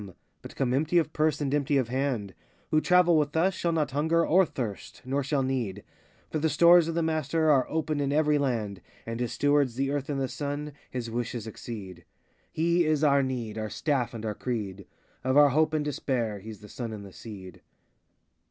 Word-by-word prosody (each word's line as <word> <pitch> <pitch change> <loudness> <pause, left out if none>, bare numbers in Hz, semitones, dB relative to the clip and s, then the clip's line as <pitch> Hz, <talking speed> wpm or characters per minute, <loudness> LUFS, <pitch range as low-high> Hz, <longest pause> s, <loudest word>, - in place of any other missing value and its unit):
but - - -11
come 125 -2 0
empty 155 +6 +1
of 160 -2 +1
purse 155 -1 +1
and 140 -1 -1
empty 145 -1 +2
of 130 -3 0
hand; 125 -7 -2 0.4
Who 155 - +4
travel 175 -2 +4
with 150 +1 -1
us 185 +4 +3
shall 170 -1 -1
not 155 -3 0
hunger 160 +4 +2
or 185 +2 +4
thirst, 110 -9 -6
nor 140 +2 -1
shall 135 0 0
need; 120 -7 -2 0.5
For 155 - -1
the 160 +1 +1
stores 170 +1 +6
of 165 - -3
the 170 - +1
Master 160 0 +1
are 130 -3 +3
open 155 -2 -1
in 140 -1 0
every 150 0 +3
land, 110 -8 -2 0.2
And 115 0 -5
his 120 -2 -2
Stewards, 145 -4 +2
the 135 +2 0
Earth 145 0 -3
and 140 -2 -1
the 135 - 0
Sun, 145 +2 -4 0.2
his 120 -2 -5
wishes 120 -1 -3
exceed. 100 -5 -8 0.5
He 170 +2 +2
is 155 -1 +1
our 140 -2 +5
need, 120 -5 -3
Our 110 0 -3
staff 125 -2 -1
and 110 -1 -6
our 105 - -1
creed; 105 -5 -4 0.4
9i 130 - -2
Of 130 - +3
our 145 -1 +8
hope 155 +3 +2
and 155 -1 -1
despair, 120 -7 -2
He's 105 0 -10
the 105 - -11
Sun 115 0 -6
and 100 -2 -8
the 95 - -12
Seed. 95 -6 -10
140 Hz, 210 wpm, -28 LUFS, 115-155 Hz, 0.5 s, our